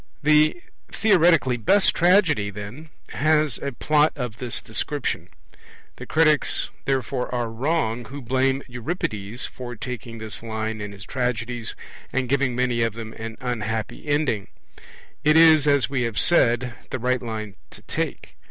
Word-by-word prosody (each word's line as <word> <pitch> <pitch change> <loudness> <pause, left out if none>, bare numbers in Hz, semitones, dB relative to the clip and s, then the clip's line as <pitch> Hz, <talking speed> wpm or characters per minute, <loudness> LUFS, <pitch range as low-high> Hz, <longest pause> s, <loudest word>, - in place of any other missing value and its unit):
The 155 - +4 0.3
theoretically 170 - +4
best 190 - +3
tragedy, 170 - +3
then, 105 +10 -8 0.2
has 155 -2 +2
a 140 - -3
Plot 150 +5 +2
of 125 -6 -5
this 125 -2 -2
description. 125 +4 -3 0.7
The - - -9
critics, 155 -2 +3 0.2
therefore, 135 -1 -1
are 120 -2 -2
wrong 125 -2 -1
who 135 +5 -8
blame 130 +1 0
Euripides 120 - -4
for 120 -1 -7
taking 115 0 -6
this 110 -1 -5
line 110 -1 -4
in 105 0 -5
his 100 0 -11
tragedies, 120 -2 -2 0.4
and 130 0 -1
giving 135 -1 +1
many 125 -1 +1
of 115 -2 +1
them 110 0 -7
an 115 0 -7
unhappy 110 +1 -3
ending. 145 -9 0 0.8
It 150 +1 +5
is, 160 -3 +7
as 140 -2 +4
we 135 -2 -1
have 115 -3 -2
said, 125 -7 +3 0.2
the - - -2
right 125 +1 0
line 110 -3 -5 0.2
to - - -15
take. 65 - -4
125 Hz, 145 wpm, -23 LUFS, 115-150 Hz, 0.8 s, is